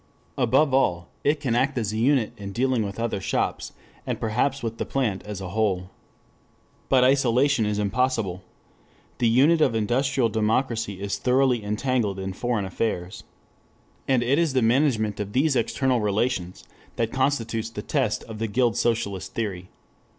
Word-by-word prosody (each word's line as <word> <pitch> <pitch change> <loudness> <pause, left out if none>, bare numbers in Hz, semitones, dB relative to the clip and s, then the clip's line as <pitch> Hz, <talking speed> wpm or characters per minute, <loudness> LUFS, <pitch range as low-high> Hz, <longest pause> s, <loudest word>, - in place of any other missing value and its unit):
Above 135 +3 +2
all 90 -10 +1
it 145 +1 +2
can 135 -5 -1
act 135 +3 +1
as 110 -3 -1
a - - -2
unit 130 -1 +2
in 100 -1 -7
dealing 125 +2 +1
with 100 +1 -6
other 115 -4 -2
shops, - - -2 0.3
and - - -3
perhaps 125 +5 0
with 115 0 -4
the - - 0
plant 115 -8 -1
as 105 -2 -6
a 95 - -5
whole. 95 -3 -1 1.0
But 130 -2 +5
isolation 130 -2 +3
is 105 -1 -1
impossible. 105 -3 0 0.8
The 120 -2 +3
unit 145 +8 +4
of 130 -6 +3
industrial 125 +3 +1
democracy 110 -1 -1
is 100 0 -3
thoroughly 125 -1 +2
entangled 105 -1 -1
in 95 0 -4
foreign 115 0 -1
affairs. 95 -2 -3 0.8
And 130 -3 +2
it 135 +6 +2
is 165 -5 +1
the 130 -2 +2
management 115 -4 +2
of 105 0 -4
these 140 +2 +2
external 130 +1 +1
relations 105 -3 -1 0.3
that 115 -1 -1
constitutes 120 -5 0
the 115 - -7
test - - -1
of 110 -1 -9
the 115 - -1
guild 115 +1 +1
socialist 100 -5 -1
theory. 95 -5 -4
115 Hz, 160 wpm, -24 LUFS, 105-130 Hz, 1.0 s, But